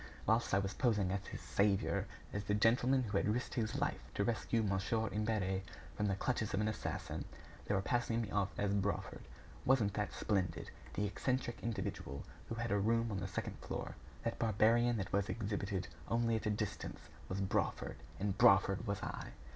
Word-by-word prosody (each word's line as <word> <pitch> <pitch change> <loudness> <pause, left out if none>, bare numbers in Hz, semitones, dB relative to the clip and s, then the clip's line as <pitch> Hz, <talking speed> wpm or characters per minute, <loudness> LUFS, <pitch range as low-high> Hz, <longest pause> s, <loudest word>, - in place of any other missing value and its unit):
Whilst 110 +2 +3
I 100 - +4
was 95 0 0
posing 105 -7 +2
as 100 0 -2
his - - -6
"saviour," 100 -1 +2 0.3
as 100 0 -2
the 105 - +2
gentleman 125 +5 +4
who 105 -3 0
had - - +2
risked 125 +3 -1
his 115 +1 -1
life 145 +1 0
to 100 - +2
rescue 115 +1 +1
Mon. 95 -2 +1 0.3
Imbert 105 -2 0 0.3
from 105 - +1
the 100 - +1
clutches 110 0 0
of - - +1
an 105 - +2
assassin, 110 - -3 0.4
they 105 - +2
were 95 - +1
passing 120 +1 +1
me 110 -3 -2
off 100 -1 +2
as 100 -1 +1
Brawford. 95 -1 -1 0.4
Wasn't 115 -7 +3
that 105 0 -1
splendid? 95 -5 -1 0.2
That 105 - 0
eccentric 120 +3 -1
individual 100 - -3 0.3
who 115 - -2
had 120 0 -2
a 100 - +3
room 115 +2 +2
on 100 - -1
the 95 - -3
second 90 - -4
floor, - - -4 0.3
that 115 - -2
barbarian 115 +2 +4
that 95 -2 -3
was 100 0 +2
exhibited 100 -2 -2 0.2
only 115 0 +2
at 110 0 -1
a - - +3
distance, 105 -1 -3 0.3
was 95 - -2
Brawford, 95 -1 0 0.2
and 100 -1 0
Brawford 100 +2 +5
was 100 -1 -2
I! - - -5
105 Hz, 185 wpm, -36 LUFS, 100-115 Hz, 0.4 s, Brawford